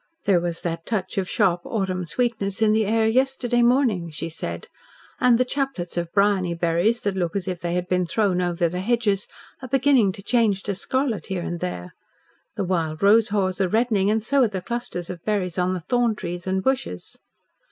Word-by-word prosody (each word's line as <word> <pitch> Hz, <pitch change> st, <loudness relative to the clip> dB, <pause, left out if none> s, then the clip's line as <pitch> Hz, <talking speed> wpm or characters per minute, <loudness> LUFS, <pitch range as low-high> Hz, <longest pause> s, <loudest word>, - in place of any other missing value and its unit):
"There 195 Hz, -3 st, +3 dB
was 170 Hz, -1 st, -3 dB
that 165 Hz, -1 st, -4 dB
touch 195 Hz, -4 st, -2 dB
of 185 Hz, -, -3 dB
sharp 180 Hz, -5 st, +2 dB
autumn 185 Hz, -5 st, -2 dB
sweetness 220 Hz, +2 st, -1 dB
in 215 Hz, -1 st, +4 dB
the 220 Hz, -1 st, +2 dB
air 220 Hz, +1 st, +2 dB
yesterday 245 Hz, 0 st, +1 dB
morning," 235 Hz, -8 st, +2 dB
she 165 Hz, +2 st, -4 dB
said. 85 Hz, -, -5 dB, 0.5 s
"And 245 Hz, -2 st, +5 dB
the 255 Hz, -, +2 dB
chaplets 265 Hz, -10 st, -3 dB
of 170 Hz, -1 st, -2 dB
briony 200 Hz, -4 st, +2 dB
berries 175 Hz, +8 st, +1 dB
that 200 Hz, -2 st, -1 dB
look 175 Hz, -2 st, -2 dB
as 195 Hz, -1 st, -2 dB
if 180 Hz, -2 st, -3 dB
they 175 Hz, 0 st, -2 dB
had 180 Hz, 0 st, -2 dB
been 180 Hz, -1 st, +1 dB
thrown 185 Hz, 0 st, +1 dB
over 175 Hz, -1 st, +1 dB
the 180 Hz, +2 st, -4 dB
hedges 205 Hz, -1 st, 0 dB, 0.3 s
are 260 Hz, -, -6 dB
beginning 260 Hz, -5 st, +3 dB
to 195 Hz, -, -10 dB
change 215 Hz, -4 st, +1 dB
to 200 Hz, -, -2 dB
scarlet 235 Hz, -, -2 dB
here 185 Hz, -2 st, -3 dB
and 175 Hz, 0 st, -4 dB
there. 90 Hz, -, -5 dB, 0.6 s
The 205 Hz, -, -1 dB
wild 165 Hz, -2 st, -1 dB
rose 215 Hz, +2 st, +5 dB
haws 195 Hz, -2 st, 0 dB
are 185 Hz, -, +2 dB
reddening, 215 Hz, -2 st, +2 dB
and 220 Hz, 0 st, +1 dB
so 275 Hz, +4 st, +2 dB
are 245 Hz, -, +5 dB
the 195 Hz, -3 st, -4 dB
clusters 210 Hz, -5 st, -4 dB
of 175 Hz, -2 st, -9 dB
berries 190 Hz, -4 st, -1 dB
on 180 Hz, +1 st, +1 dB
the -, -, -3 dB
thorn 240 Hz, +4 st, +1 dB
trees 175 Hz, -2 st, -6 dB
and 190 Hz, 0 st, 0 dB
bushes." 260 Hz, -, -2 dB
195 Hz, 205 wpm, -23 LUFS, 175-225 Hz, 0.6 s, And